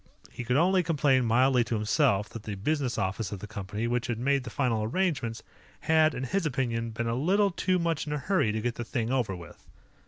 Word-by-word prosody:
He - - -6
could 125 +2 +1
only 185 +4 +4
complain 145 -6 +2
mildly 125 +2 +4
to 120 - -2
himself 105 -1 +2
that 115 - -8
the 105 -1 -5
business 135 +4 -1
office 100 +1 -2
of 100 - -4
the 105 - -8
company, 105 0 -5
which 120 0 -1
had 120 -3 -2
made 135 +2 +1
the - - -5
final 115 -3 0
arrangements, 120 - -1 0.4
had, 160 -1 +3
in 125 - -4
his 195 +9 -1
opinion, 120 -6 -1
been 115 +1 -4
a 115 - 0
little 195 - +2
too 185 +1 0
much 165 -3 -1
in 150 - -2
a - - -1
hurry 165 - +1
to 110 +1 -2
get 120 +1 -1
the 120 - -5
thing 115 0 -2
over 120 -8 0
with. 85 -3 -13
120 Hz, 225 wpm, -28 LUFS, 110-150 Hz, 0.4 s, only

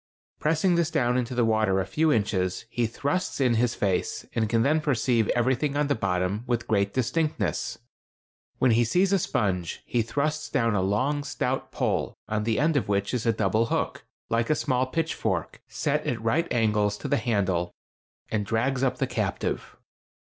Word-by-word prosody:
Pressing 160 +4 +2
this 170 -2 +2
down 125 -7 +1
into 125 0 -1
the 120 -1 +3
water 110 -4 +2
a 95 - -1
few 155 - +1
inches, 95 -6 0
he 120 -2 0
thrusts 145 +11 -2
in 125 -3 +3
his 120 +1 +1
face, 95 -3 -1
and 110 -2 0
can 115 0 +2
then 155 +4 +2
perceive 120 -6 +1
everything 130 +4 +1
on 150 - +2
the 145 - +1
bottom 95 -1 -1
with 120 -1 -1
great 100 -2 +1
distinctness. 150 +6 -1 0.8
When 130 - +3
he 115 +2 +4
sees 185 - +2
a 195 - +4
sponge 90 - -1
he 120 - +1
thrusts 150 +6 -2
down 115 -6 +1
a 100 - +1
long, 130 +10 0
stout - - -2
pole, - - -1
on 105 0 -1
the 115 -1 +1
end 155 +3 +2
of 140 - 0
which 100 +2 0
is 120 -2 -1
a - - +5
double 110 +1 +1
hook, - - -2 0.2
like 115 0 0
a 155 - +4
small 130 -2 0
pitchfork, 160 +4 -2
set - - -1
at 120 - -1
right 140 +10 0
angles 105 -3 +2
to - - -5
the - - +2
handle, 95 -7 0 0.6
and 105 -2 0
drags 120 +5 0
up 130 -1 +1
the 135 - +1
captive. - - -3
120 Hz, 185 wpm, -26 LUFS, 105-140 Hz, 0.8 s, a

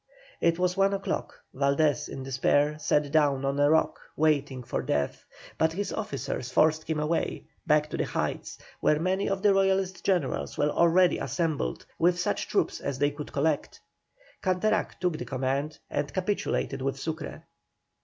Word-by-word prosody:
It 165 0 +3
was 180 0 +1
one 195 0 +3
o'clock, 195 - -3 0.2
Valdés 140 0 +1
in 135 - -6
despair, 145 +3 +1
sat 150 -1 +1
down 145 -3 +3
on 140 +1 0
a 145 0 +5
rock, 160 +1 +2 0.2
waiting 145 -4 +1
for - - -2
death; 70 -1 -1 0.4
but 160 0 +3
his 200 +3 -3
officers 140 - -4
forced 155 +3 +2
him 160 -1 0
away, 155 +2 -1 0.2
back 150 0 +4
to - - -3
the - - 0
heights, - - -3 0.2
where 150 - +3
many 185 +4 0
of 195 0 -2
the 205 -1 +6
Royalist 190 -1 +1
generals 140 - 0
were 150 0 +2
already 170 +2 +4
assembled, 155 - -2
with 175 +1 +3
such 175 - -1
troops - - 0
as 140 -2 -3
they 145 +1 +2
could 145 0 -8
collect. 145 +1 -1 0.6
Canterac 190 +3 0
took 180 -4 0
the - - -4
command, 135 +3 -2
and 145 - -2
capitulated 185 -7 -1
with 135 0 -1
Sucre. 160 +2 -5
155 Hz, 165 wpm, -28 LUFS, 140-180 Hz, 0.6 s, the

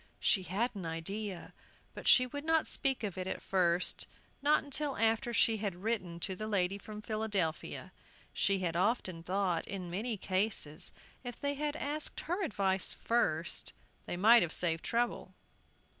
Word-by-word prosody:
She 195 - +3
had 200 +7 -1
an 195 -3 -6
idea, 180 +4 -4 0.4
but - - -7
she 255 - +7
would 285 +3 -6
not 320 0 +3
speak 270 -4 0
of 195 -3 -3
it 185 - -3
at - - -3
first, 180 -2 +1 0.3
not 295 +2 +4
until 285 0 -2
after 225 +1 +2
she 230 -1 +3
had 200 -3 -4
written 185 -7 -1
to 190 +1 -1
the 215 +3 -5
lady 200 -2 +1
from 210 +1 -9
Philadelphia. 210 -7 -2 0.4
She 195 - +2
had 175 -3 -2
often 185 -3 0
thought, 180 -1 0
in 185 -3 -5
many 215 +5 -2
cases, 185 -4 0 0.3
if 245 -2 -7
they 285 0 0
had 295 +1 -2
asked 300 0 -3
her 355 +5 -2
advice 195 - 0
first, 170 -9 0 0.3
they 175 - -3
might 225 +5 +7
have 170 - 0
saved 165 -2 0
trouble. 240 +1 -1
205 Hz, 160 wpm, -33 LUFS, 180-240 Hz, 0.4 s, she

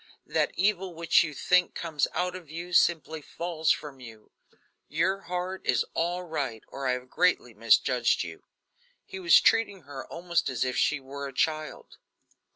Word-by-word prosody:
That - - +1
evil 190 -2 0
which 165 0 +4
you 155 - -4
think 180 +4 +2
comes 160 -4 -1
out 180 +1 -1
of 175 -5 -10
you, 170 +3 -7
simply 160 -2 +2
falls 160 0 -3
from 145 -3 0
you; 115 -4 -13 0.6
your 185 +6 0
heart 180 +1 -3
is 120 -3 +2
all 175 +2 -1
right, 140 -10 -4
or 135 -1 -4
I 125 - +2
have 125 0 -5
greatly 170 -6 +1
misjudged 115 +2 +3
you." 80 -2 -9 0.6
He 190 - -8
was 170 -2 +7
treating 205 -4 +2
her 140 -2 -8
almost 170 -3 -1
as 130 -1 -1
if 125 - -2
she 150 - +2
were 140 +1 -7
a 135 - -9
child. 155 +3 -2
160 Hz, 165 wpm, -28 LUFS, 135-180 Hz, 0.6 s, was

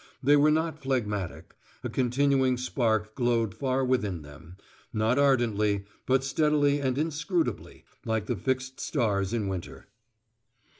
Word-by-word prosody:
They 145 +3 +6
were 145 +1 +5
not 160 0 0
phlegmatic: 105 -8 -3 0.3
a - - -1
continuing 130 0 +2
spark 110 -4 0
glowed 120 -5 +1
far 130 -1 0
within 105 -10 0
them, 75 +5 -13 0.3
not 110 +4 +1
ardently, 105 -7 +2 0.2
but 130 0 +3
steadily 145 +1 +2
and 130 -1 0
inscrutably, 160 +3 -2 0.2
like 110 -2 -1
the 120 - -1
fixed 130 +5 -2
stars 100 - 0
in 115 -4 -1
winter. 95 -3 -6
125 Hz, 130 wpm, -28 LUFS, 105-140 Hz, 0.3 s, They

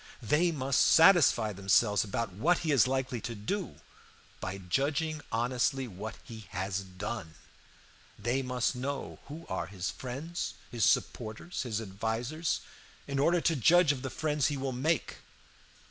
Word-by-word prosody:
They 160 +10 +3
must 135 -3 +1
satisfy 160 - +6
themselves 100 +2 +3
about 105 0 -3
what 160 - +2
he 155 - +2
is 135 -4 +5
likely 130 -3 -1
to 115 - -5
do 175 - -3 0.6
by 95 +1 -4
judging 145 - -1
honestly 125 +3 0
what 105 +2 -7
he 110 -5 -10
has 95 0 -2
done; 95 -2 -6 0.8
they 120 +6 0
must 125 0 -1
know 135 +2 -4
who 160 +4 -9
are - - -3
his 95 -1 -4
friends, 140 +7 -5 0.2
his 115 -6 +1
supporters, 110 - -1
his 115 -4 -2
advisers, 115 - -2 0.5
in 140 -1 -2
order 170 +4 +3
to 165 - +2
judge 165 +4 +5
of 135 -3 -4
the 130 - -4
friends 150 0 0
he 145 -2 -2
will 135 0 -2
make. 140 +5 -1
125 Hz, 145 wpm, -30 LUFS, 105-150 Hz, 0.8 s, satisfy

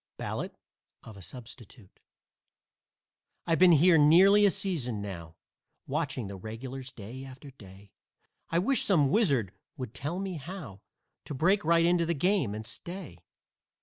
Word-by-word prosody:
BALLADE - - -5 0.5
OF 110 - -12
A 100 - -12
SUBSTITUTE 115 +1 -11 1.5
I've 165 -1 +1
been 180 -1 +7
here 165 +2 +5
nearly 190 +7 +6
a - - +5
season 145 - -2
now, 85 -5 -7 0.5
Watching 145 -4 -3
the 100 0 -7
regulars, 125 +6 -8
day 120 +4 -9
after 135 +1 -11
day; 100 -4 -16 0.6
I 165 - 0
wish 245 +10 +2
some 150 -9 +3
wizard 140 - +2 0.3
would 125 -4 -6
tell 150 +6 -4
me 190 -2 -4
how 145 - -9 0.4
To 145 - -6
break 190 +9 +2
right 165 +1 +3
into 170 -1 +2
the 170 - 0
game 155 - +1
and 110 +1 -7
stay. 160 - -8
140 Hz, 145 wpm, -29 LUFS, 110-175 Hz, 1.5 s, been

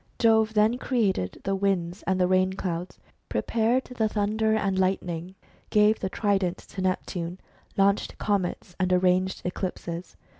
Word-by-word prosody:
Jove 220 -1 +3
then 215 +4 +3
created 200 - 0
the 195 - 0
winds 190 -2 -1
and 190 -1 +1
the 180 - +4
rain 185 0 +3
clouds, 180 -2 -4 0.3
pre - - -1
pared 235 +3 +1
the 225 -4 -1
thunder 220 +1 +1
and 195 -3 0
lightning, 185 -1 -1 0.3
gave 210 +1 +4
the 190 - -2
trident 195 -3 0
to 190 - -8
Neptune, 180 -1 -2 0.4
launched 200 +1 +2
comets, 185 -3 -1
and 185 -1 +1
arranged 185 +1 +2
eclipses. 180 -1 -4
190 Hz, 145 wpm, -26 LUFS, 180-215 Hz, 0.4 s, the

